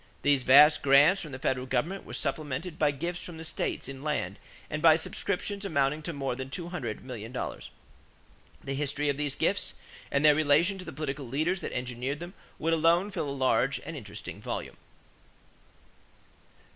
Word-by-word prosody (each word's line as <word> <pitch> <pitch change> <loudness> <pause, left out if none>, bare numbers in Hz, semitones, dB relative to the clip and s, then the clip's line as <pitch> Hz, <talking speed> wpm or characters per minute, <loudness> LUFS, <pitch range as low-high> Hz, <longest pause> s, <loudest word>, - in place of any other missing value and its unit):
These 145 -2 +4
vast 145 +4 +7
grants 145 +7 +6
from 155 - -7
the 130 - -5
federal 130 -1 -1
government 150 +10 -1
were - - -7
supplemented 150 +3 -3
by 150 - +4
gifts 170 +5 -3
from 170 -2 -7
the 160 - -7
states 155 -5 -2
in 135 0 -8
land 140 -11 -2 0.3
and 155 - -4
by 160 -1 +8
subscriptions 200 +4 -2
amounting 150 -4 +1
to 170 - -4
more 135 -4 -2
than 130 +1 -6
two 170 +5 -4
hundred 120 - -4
million 115 -3 -7
dollars. 125 - -5 0.9
The 135 - -3
history 145 +1 -1
of 140 - 0
these 145 -2 -2
gifts - - 0 0.3
and 140 +2 +1
their 150 - +8
relation 155 +6 +3
to 185 - -8
the - - -6
political 140 -2 -4
leaders 155 +9 0
that - - -4
engineered 125 +3 -3
them 175 +2 -8 0.2
would 165 +1 0
alone 170 +5 +3
fill 170 -7 -2
a 140 -1 -3
large 130 +3 +2
and 165 - -6
interesting 105 -6 -8
volume. - - -5
145 Hz, 180 wpm, -29 LUFS, 135-165 Hz, 0.9 s, by